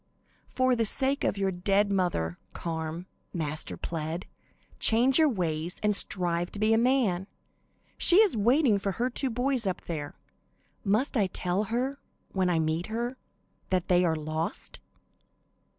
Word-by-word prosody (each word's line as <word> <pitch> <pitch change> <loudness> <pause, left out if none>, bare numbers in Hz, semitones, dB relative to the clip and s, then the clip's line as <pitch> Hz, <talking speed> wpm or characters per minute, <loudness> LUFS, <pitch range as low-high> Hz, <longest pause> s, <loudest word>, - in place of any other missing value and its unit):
"For 255 -1 +1
the 230 - +1
sake 275 +4 0
of - - 0
your 195 -1 0
dead 195 +3 +1
mother, 175 - -1
Carm," 165 +1 -5 0.3
Master 155 -2 -3
pled, 165 +1 -4 0.5
"change 250 +6 +4
your 315 -2 +5
ways 170 - -2
and 210 -1 +3
strive 175 -3 +5
to 205 - -6
be 215 +1 +3
a - - +4
man. 230 -7 +1 0.7
She 350 - +5
is 420 - +5
waiting 235 +1 +3
for 195 0 -2
her 245 +5 -2
two 265 +2 -1
boys 245 -1 0
up 185 - -2
there. 150 -4 -6 0.7
Must 220 +8 0
I 205 -5 +2
tell 185 +3 -2
her, 255 +6 -2 0.3
when 185 -2 0
I 175 - +1
meet 160 +2 -1
her, 235 +3 -3 0.5
that 185 -2 -1
they 180 0 +4
are 165 -2 +1
lost?" 155 +1 -4
195 Hz, 150 wpm, -28 LUFS, 170-240 Hz, 0.7 s, your